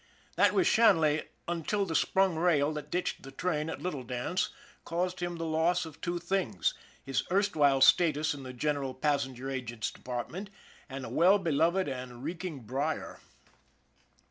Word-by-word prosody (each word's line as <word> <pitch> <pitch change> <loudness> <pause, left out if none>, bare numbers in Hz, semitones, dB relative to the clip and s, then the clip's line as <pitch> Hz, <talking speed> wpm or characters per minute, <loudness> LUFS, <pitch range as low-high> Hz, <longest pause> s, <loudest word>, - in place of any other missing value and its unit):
That - - +4
was 370 - +3
Shanley 165 - +4 0.2
until 175 +4 -1
the 165 - -4
sprung 190 +2 +2
rail 155 -3 +2
that 150 -1 -6
ditched 180 - -2
the 135 - -10
train 155 +2 -2
at - - -6
Little 175 -7 -3
Dance 125 +9 -2 0.3
caused 180 +2 -2
him 175 -1 -3
the 165 - -3
loss 165 +2 +1
of 160 -1 -12
two 175 0 -2
things 175 - 0 0.3
his 135 -1 0
erstwhile 155 -9 +3
status 155 +2 +5
in 140 - -8
the 130 -1 -7
general 135 0 -2
passenger 135 -2 -1
agent's 120 -4 -3
department, 130 - -6 0.4
and 135 -1 -6
a - - -6
well 185 +5 +5
beloved 170 +1 +1
and 125 -2 -6
reeking 165 -2 -5
brier. 135 +7 -3
155 Hz, 155 wpm, -30 LUFS, 135-175 Hz, 0.4 s, status